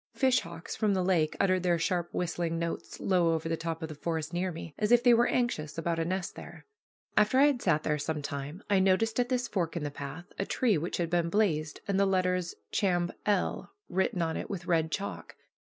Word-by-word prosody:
Fish 260 -1 +4
hawks 165 0 -7
from 210 -3 +1
the 185 - +1
lake 170 -4 +2
uttered 185 -2 +3
their 175 -1 +2
sharp 175 +1 -1
whistling 170 -1 -1
notes 170 0 -4
low 175 -3 +2
over 160 0 -3
the 165 - 0
top 165 0 -4
of - - -2
the - - -5
forest 160 +1 -3
near 180 +1 0
me, 165 -1 -8
as 210 +1 +1
if 240 0 +6
they 245 -1 +7
were 235 +1 +4
anxious 160 -13 -1
about 165 0 -1
a 165 - 0
nest 185 +1 -2
there. - - -11 0.5
After 215 +4 +4
I 275 - +7
had 280 -4 +2
sat 155 -4 +2
there 150 0 0
some 150 0 -3
time 145 +5 -5
I 200 -2 +3
noticed 210 +5 +2
at 245 0 +1
this 250 -1 0
fork 170 -4 -2
in 160 - -3
the 145 - -3
path 140 +4 -7
a 195 - 0
tree 235 -5 +2
which 170 +4 -3
had 170 -2 -1
been 170 -1 +2
blazed, 165 -7 0
and 195 -1 +1
the 200 - +4
letters 180 -2 0 0.2
"Chamb. 175 -3 +1 0.2
L." 205 -3 0 0.2
written 185 -1 0
on 160 -1 -1
it - - -5
with 180 -4 -5
red 165 -2 +1
chalk. 200 +2 -4
175 Hz, 230 wpm, -30 LUFS, 165-200 Hz, 0.5 s, they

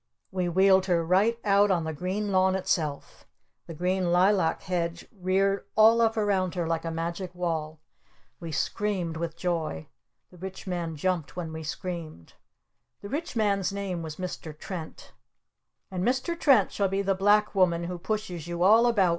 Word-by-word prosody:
We 180 -2 -1
wheeled 190 +1 +4
her 170 -2 +2
right 200 +7 +3
out 205 0 +4
on 175 -4 +2
the 160 0 -3
green 190 +6 -2
lawn 190 0 +3
itself! 155 -6 -2 0.4
The 165 - -7
green 180 +1 0
lilac 180 -2 +3
hedge 170 -2 -3
reared 195 +1 +1
all 225 +2 +6
up 225 -1 +2
around 195 -4 +1
her 175 -2 -1
like 165 0 -1
a 165 - -3
magic 170 +2 -4
wall! 160 -3 -3 0.6
We 165 -2 -6
screamed 180 +1 -1
with 165 0 -4
joy! 165 - -2 0.4
The 180 - -16
Rich 190 +1 -7
Man 175 -3 -3
jumped 160 -3 -2
when 165 -3 -5
we 160 - -5
screamed. 160 - -6 0.7
The 200 - -6
Rich 300 +1 -4
Man's 200 -4 +1
name 195 -3 -3
was 160 -2 -6
Mr. 165 -4 -6
Trent. 165 -1 -8 0.8
"And 185 -1 -2
Mr. 260 - 0
Trent 255 -10 +4
shall 200 - 0
be 195 +1 -1
the 195 0 +2
Black 205 +2 +3
Woman 175 -3 +2
who 175 0 -5
pushes 185 -4 -4
you 175 0 -2
all 225 +5 +6
about!" 205 -6 +3
185 Hz, 170 wpm, -27 LUFS, 170-200 Hz, 0.8 s, all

